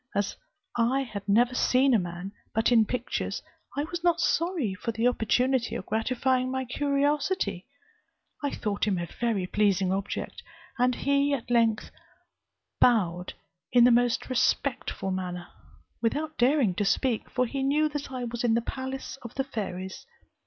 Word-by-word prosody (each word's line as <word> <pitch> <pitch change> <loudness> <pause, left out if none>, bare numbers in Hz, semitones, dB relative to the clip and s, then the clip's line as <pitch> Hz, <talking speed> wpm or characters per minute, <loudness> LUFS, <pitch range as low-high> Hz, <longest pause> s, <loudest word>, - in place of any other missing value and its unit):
As 205 0 0 0.4
I 245 +3 +2
had 210 -6 -6
never 240 +5 +4
seen 255 +1 +3
a 225 - +5
man, 175 +1 -5 0.2
but 225 +2 +3
in 225 -3 +5
pictures, 250 -1 -3 0.3
I 285 - +1
was 340 +2 -5
not 345 -1 +3
sorry 335 - +1
for 220 +4 -3
the 225 +2 +1
opportunity 250 +1 +1
of - - -5
gratifying 255 +3 0
my 260 0 -2
curiosity. 280 - 0 0.8
I 285 - +1
thought 210 -5 -2
him 195 -3 +1
a 175 - -2
very 215 +1 -1
pleasing 195 -1 +2
object, 195 +1 -4 0.4
and 250 0 +3
he 280 0 +2
at 245 -2 -7
length 230 -2 +2 0.9
bowed 180 -7 +2 0.4
in 245 -1 +6
the 245 - +7
most 240 0 +2
respectful 240 -5 0
manner, 180 -1 -4 0.5
without 300 +7 -1
daring 250 -5 +3
to - - +1
speak, 230 +3 0
for 255 0 +1
he 270 +3 -3
knew 295 +3 +2
that 290 -2 -5
I 255 -1 -4
was 240 0 -4
in 230 -2 +3
the 235 - +2
palace 265 +2 -5
of 235 - -9
the 270 - 0
fairies. 190 - -5
240 Hz, 160 wpm, -27 LUFS, 205-270 Hz, 0.9 s, the